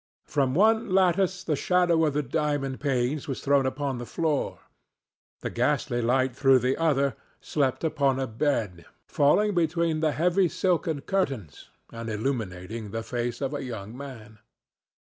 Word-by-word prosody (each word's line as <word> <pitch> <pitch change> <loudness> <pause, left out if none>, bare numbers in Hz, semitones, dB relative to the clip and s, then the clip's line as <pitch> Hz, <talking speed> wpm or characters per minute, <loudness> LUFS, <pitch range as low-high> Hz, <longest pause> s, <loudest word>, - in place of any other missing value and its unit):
From 135 -3 0
one 220 +4 +3
lattice 185 0 +2
the 160 -5 0
shadow 175 0 +2
of 150 - 0
the 150 - +1
diamond 140 -1 -1
panes 135 +2 -1
was 135 - -3
thrown 140 -1 +2
upon 135 -1 -2
the 120 - -5
floor; 155 +2 -1 0.8
the - - -4
ghostly 120 0 0
light 130 +1 +1
through 135 -1 +5
the 130 +2 +1
other 140 -6 +1 0.2
slept 140 -2 -1
upon 140 -4 +1
a 135 - 0
bed, 110 - -2 0.2
falling 205 +9 +3
between 165 -2 +1
the 155 -1 +1
heavy 180 +5 +2
silken 165 -5 0
curtains 135 - -3 0.2
and 115 0 -6
illuminating 110 -3 -3
the 115 +2 -4
face 120 +2 -3
of 135 +1 -2
a 145 - -3
young 110 -3 -7
man. 115 -6 -10
140 Hz, 150 wpm, -26 LUFS, 120-160 Hz, 0.8 s, through